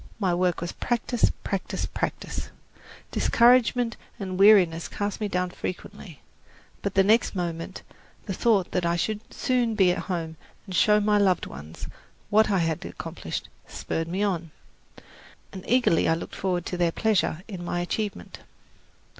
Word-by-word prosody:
My 190 -4 +1
work 180 -1 +1
was 170 - -3
practice, 240 0 0
practice, 195 -2 -2
practice. - - -4 0.6
Discouragement 240 -1 +3 0.2
and 185 -2 -4
weariness 185 -5 +6
cast 205 +1 -4
me 210 - 0
down 180 -2 -1
frequently; 185 -3 -7 0.6
but 200 - -3
the 195 - +6
next 220 +2 +3
moment 170 -2 -4 0.4
the 195 - -3
thought 200 -2 +2
that 180 - 0
I 170 0 +1
should 210 +5 -1
soon 245 -4 0
be 190 -4 +4
at 180 - -1
home 165 -3 -3 0.3
and 190 - -8
show 210 +3 +5
my 210 0 +3
loved 190 -3 +2
ones 75 +4 -9 0.5
what 215 +1 +5
I 200 - +2
had 165 -3 0
accomplished, - - -6 0.2
spurred 165 0 -3
me 185 +4 -1
on, 175 -5 -1 1.0
and 190 -1 -8
I - - -15
eagerly 240 -9 +3
looked 165 - -7
forward 180 -2 -1
to 180 - -3
their 175 -1 +2
pleasure 195 -4 +1
in 190 -5 -7
my 175 0 -2
achievement. 205 +4 -4
190 Hz, 155 wpm, -26 LUFS, 175-210 Hz, 1.0 s, weariness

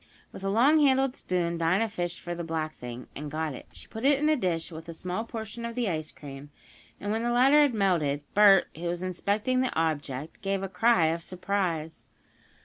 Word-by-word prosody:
With - - -10
a - - -1
longhandled 270 +3 +4
spoon 170 -2 -2
Dinah 180 +7 +2
fished 175 -5 -4
for 175 - -4
the 170 0 -5
black 160 -1 -3
thing, 120 0 -7
and 150 +1 -5
got 155 0 -2
it. - - -10
She - - -13
put 220 - -8
it 280 +1 +5
in 300 +2 +1
a 310 - +4
dish, 175 - -2
with 160 +1 -9
a 165 - -6
small 180 +7 -4
portion 225 0 -6
of 235 0 -5
the 245 -3 0
ice 155 -4 -3
cream, 140 0 -10 0.5
and 205 - -3
when 220 +1 0
the 240 - 0
latter 265 +5 +5
had 285 -5 +3
melted, 160 -8 +1
Bert, 200 -3 +7
who 165 +3 -7
was 175 +1 -3
inspecting 205 +7 0
the 260 - -1
object, 150 - -3
gave 195 -1 -1
a - - -2
cry 190 -1 +3
of 170 - -5
surprise. 180 -3 -3
185 Hz, 210 wpm, -28 LUFS, 165-230 Hz, 0.5 s, Bert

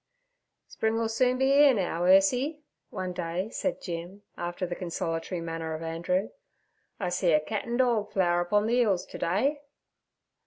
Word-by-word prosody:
'Spring 220 0 -1
'll 230 - 0
soon 250 +3 +1
be 265 +1 +3
'ere 285 -2 +6
now, 175 -4 -1
Ursie' 250 - +3 0.3
one 185 -1 -4
day 180 +4 -3
said 280 - -2
Jim, 175 +3 -6
after 175 +2 -3
the 175 - -4
consolatory 170 0 -3
manner 165 -1 -4
of 160 - -7
Andrew. 170 +4 -1 0.7
'I 185 -4 -1
see 180 -1 +1
a 155 - +5
cat 205 +7 -4
an' 235 0 -2
dorg 235 -5 +1
flower 175 -2 +2
upon 205 +4 +1
the 240 +2 +2
'ills 200 -6 +1
to - - -10
day.' 270 - 0
190 Hz, 165 wpm, -28 LUFS, 175-235 Hz, 0.7 s, ere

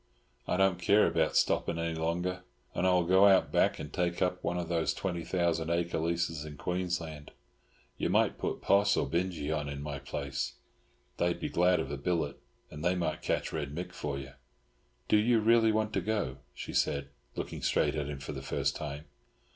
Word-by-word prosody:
I - - +1
don't 95 -1 +3
care 105 +1 +5
about 80 -1 +1
stopping 85 - +2
any 85 0 -1
longer; 85 +3 -1 0.3
and 90 - +1
I - - +5
will 90 -1 +4
go 95 +3 +6
out 95 -1 +4
back - - +3
and - - -7
take 85 -1 0
up 90 0 0
one 90 - -1
of 85 -1 -2
those 85 -2 0
twenty 85 -3 -3
thousand 85 -3 0
acre 85 -1 0
leases 85 -2 -1
in 75 -2 -9
Queensland. 85 -4 -3 0.7
You - - 0
might - - +2
put - - -3
Poss 100 0 +4
or - - +2
Binjie 85 -3 -1
on 75 -2 -3
in 70 0 -5
my 75 -1 -4
place. 70 -2 -3 0.6
They 85 - +2
would 85 - -1
be - - -3
glad 90 +1 +3
of 65 - -3
a 70 - -3
billet, 80 0 -1 0.3
and 75 0 -8
they 90 +1 +2
might 80 -3 -2
catch - - -1
Red 75 -2 -3
Mick 90 +2 -4
for 70 -2 -3
you." 70 0 -7 0.8
"Do 105 - +5
you 115 +2 +4
really 115 0 +5
want 110 0 0
to - - +1
go?" 105 -12 -1 0.2
she - - -6
said, 70 0 +1 0.3
looking - - -5
straight - - +2
at 75 -2 -2
him 75 - -4
for 70 - -6
the 70 -2 -6
first 70 - -1
time. 75 +1 -5
85 Hz, 200 wpm, -31 LUFS, 75-90 Hz, 0.8 s, go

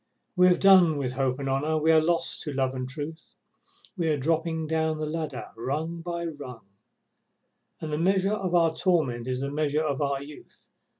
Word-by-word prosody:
We 180 -1 +6
have 180 - +4
done 185 -6 +6
with 130 -3 -2
Hope 130 -1 0
and 140 -1 -4
Honour, 145 +4 0
we 155 +1 +3
are 160 -1 +6
lost 170 +1 0
to 150 - -4
Love 130 -1 0
and 130 -1 -4
Truth, 150 +3 -8 0.6
We 170 -4 -1
are 150 - +1
dropping 160 +2 -1
down 160 0 0
the 155 - -3
ladder 155 -3 -4
rung 155 +8 -3
by 170 0 -4
rung, 135 - -8 1.1
And 155 -1 -5
the 150 - -1
measure 190 +3 +2
of 190 -4 -1
our 165 -2 +4
torment 155 -10 0
is 130 0 -2
the 140 0 -3
measure 150 +1 0
of 145 -2 -2
our 140 -1 0
youth. 145 +1 -14
155 Hz, 190 wpm, -26 LUFS, 140-165 Hz, 1.1 s, We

